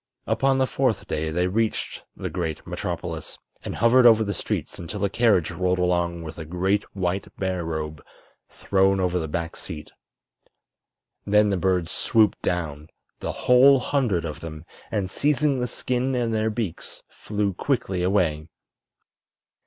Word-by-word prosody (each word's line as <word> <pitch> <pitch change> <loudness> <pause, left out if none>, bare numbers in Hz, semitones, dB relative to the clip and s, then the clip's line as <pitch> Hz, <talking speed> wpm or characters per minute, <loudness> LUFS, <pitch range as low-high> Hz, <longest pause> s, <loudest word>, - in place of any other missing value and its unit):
Upon 135 0 +2
the 130 - +3
fourth 130 -5 0
day 80 +1 -2
they 90 +3 0
reached 110 +4 -1
the 95 - -5
great 80 -2 -3
metropolis, - - -5 0.3
and - - -5
hovered 120 +3 +6
over 110 -1 +6
the 100 -1 -2
streets - - -4
until 100 +4 -3
a 100 - -2
carriage 105 -7 +3
rolled 90 0 0
along 85 -1 0
with 80 0 -8
a - - -4
great 95 +5 0
white 95 0 -1
bear 95 -2 -1
robe 80 -2 -4 0.5
thrown 95 0 +2
over 90 -1 +1
the 80 - -3
back 85 +2 -3
seat. 80 -4 -8 1.3
Then 105 0 +3
the - - +2
birds 90 -1 +1
swooped 110 0 +2
down—the 80 -3 -4
whole 130 +2 +5
hundred 120 - 0
of 75 - -5
them—and 85 +5 -6
seizing 145 0 +2
the 125 - -1
skin 125 +2 -1
in 120 -2 0
their 110 0 +1
beaks 110 -6 -5
flew 105 -2 -2
quickly 95 -4 -1
away. 90 -5 +1
95 Hz, 145 wpm, -24 LUFS, 85-115 Hz, 1.3 s, hovered